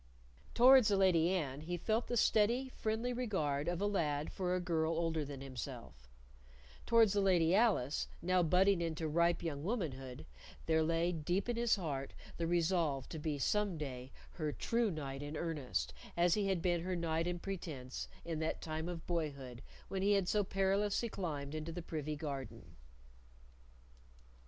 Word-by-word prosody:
Towards 255 -1 +8
the 200 -2 +3
Lady 175 -4 +4
Anne 150 -7 -1
he 175 +3 -3
felt 220 +6 0
the 240 - -1
steady 235 +5 +3
friendly 225 +1 -2
regard 160 - -1
of 175 0 -1
a 200 - 0
lad 155 -7 0
for 180 -1 -1
a - - 0
girl 165 -2 0
older 165 -2 0
than 140 -2 -7
himself; 120 - -8 0.8
towards 225 -3 +5
the 205 - +2
Lady 175 -3 +4
Alice, 195 - +2
now 185 +1 +2
budding 180 +2 +4
into 160 -1 -2
ripe 170 +3 +2
young 145 -4 -3
womanhood, 140 - -3 0.4
there 160 0 +3
lay 165 +2 +1
deep 175 +5 -1
in 240 - 0
his 235 0 +3
heart 145 -8 -4 0.2
the 165 - -1
resolve 165 -5 +1
to 160 - -5
be 150 -1 -2
some 205 +4 +1
day 130 -3 -6 0.2
her 155 -3 -3
true 230 +7 0
knight 140 -5 -5
in 145 +1 -5
earnest 155 -6 -2 0.2
as 170 0 +4
he 205 -2 +1
had 190 -3 0
been 175 -2 +2
her 185 +1 -2
knight 165 -1 0
in 175 0 -1
pretence 160 -9 -5 0.2
in 165 -2 -3
that 160 0 -1
time 160 +1 -4
of 170 -2 -6
boyhood 140 -8 -3 0.3
when 190 - -3
he 200 +1 +4
had 195 -3 +2
so 210 +2 +2
perilously 195 +4 +1
climbed 150 -8 -4
into 155 +1 -4
the 175 +1 -6
privy 155 -2 -3
garden. 140 -4 -6
170 Hz, 170 wpm, -35 LUFS, 150-195 Hz, 0.8 s, Towards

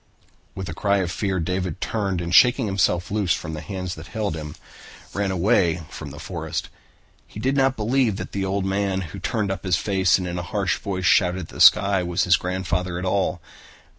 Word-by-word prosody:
With 95 -1 -5
a 85 - -5
cry 100 +4 +1
of 90 -3 -1
fear, 95 0 -1
David 90 0 -2
turned 100 -5 -2
and, 85 0 -4
shaking 125 +3 +6
himself 95 -3 0
loose 100 -4 +1
from 80 -2 -6
the 75 - -5
hands 95 -3 -5
that 80 +1 -10
held 105 -7 -3
him, 75 -1 -7 0.6
ran 100 0 -1
away 90 -3 +2
through 75 - -7
the 70 - -10
forest. 80 -1 -4 0.6
He - - -10
did 130 +5 0
not 135 -1 +2
believe 115 0 +1
that - - -6
the 100 -1 -2 0.2
man 95 0 0
who 85 -5 -7
turned 105 -4 -1
up 95 - -4
his 95 -3 +2
face 95 -3 +2
and 90 - -4
in 90 0 -3
a - - -2
harsh 95 +2 -1
voice 95 -3 -3
shouted 95 -2 +3
at 80 - -9
the - - -6
sky 100 -1 +6
was 90 -1 0
his 90 0 +5
grandfather 90 -1 -2
at 90 - -4
all. 95 -1 0
95 Hz, 205 wpm, -23 LUFS, 90-100 Hz, 0.6 s, shaking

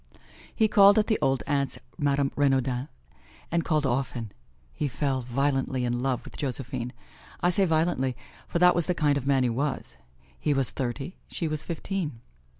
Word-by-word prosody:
He 220 - +4
called 200 -1 +7
at 215 - +4
the 220 - +1
old 135 -1 +1
aunt's, 140 -2 0 0.2
Madame 140 -1 +1
Renaudin's, 135 -2 +1 0.6
and 170 0 +1
called 155 -3 +1
often. 125 -4 -2 0.4
He 150 - -1
fell 135 0 -1
violently 135 0 0
in 120 0 -1
love 130 -2 -1
with - - -11
Josephine. 125 -3 -3 0.5
I 175 - +3
say 195 +2 +5
violently, 160 -6 +1 0.3
for - - -1
that 180 +1 +6
was 175 - +1
the 180 - +1
kind 150 -3 +2
of 140 -1 -3
man 135 -2 +3
he 125 - +2
was. 135 - -3 0.4
He 145 - +1
was 135 -2 0
thirty, 135 +6 -4
she 165 - -3
was 155 -1 -2
fifteen. 165 - -4
140 Hz, 170 wpm, -27 LUFS, 130-160 Hz, 0.6 s, called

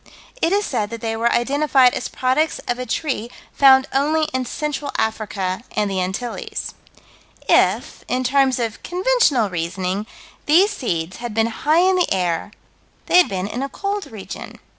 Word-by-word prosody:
It 330 - +2
is 410 +1 +2
said 215 -5 -2
that 230 0 -7
they 225 -1 -2
were 230 +1 +1
identified 270 0 +3
as - - -3
products 260 +5 0
of 245 +1 -1
a 250 - -4
tree 240 -2 -2 0.2
found 265 -1 +6
only 305 +4 +2
in 260 0 -1
Central 295 +2 -3
Africa 200 -3 -2
and 210 -1 0
the 190 -1 -1
Antilles. 195 +6 -4 0.7
If - - +2
in 255 +1 -1
terms 265 0 +2
of 230 -3 -3
conventional 355 - +2
reasoning 180 +4 -3 0.4
these 360 +8 +5
seeds 175 - -3
had 235 -3 -6
been 225 0 +3
high 310 +8 +2
in 375 -1 +3
the 360 - +1
air, 180 -1 0 0.6
they - - +4
had 360 - +4
been 185 -1 -2
in 225 +5 -4
a 275 - -3
cold 400 +5 -3
region. 210 -3 -8
245 Hz, 165 wpm, -21 LUFS, 210-295 Hz, 0.7 s, found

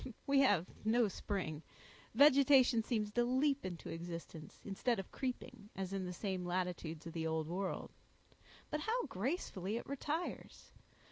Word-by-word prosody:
We 275 0 +4
have 205 -11 +4 0.2
no 225 +1 +4
spring; 180 -6 -3 0.5
vegetation 270 -3 +7
seems 215 -2 -1
to 240 +3 +2
leap 270 +3 +2
into 175 -3 -5
existence, 165 -2 -7
instead 220 +4 0
of 195 - -6
creeping, 250 -4 -5
as 190 0 -3
in 195 -1 -2
the 180 - -3
same 185 0 -3
latitudes 175 -3 -2
of 165 - -6
the 160 -1 -1
Old 160 -1 -1
World; 185 +3 -3 0.8
but 300 - 0
how 455 +9 0
gracefully 205 - -2
it - - -5
retires! 300 +5 -4
205 Hz, 145 wpm, -37 LUFS, 180-260 Hz, 0.8 s, vegetation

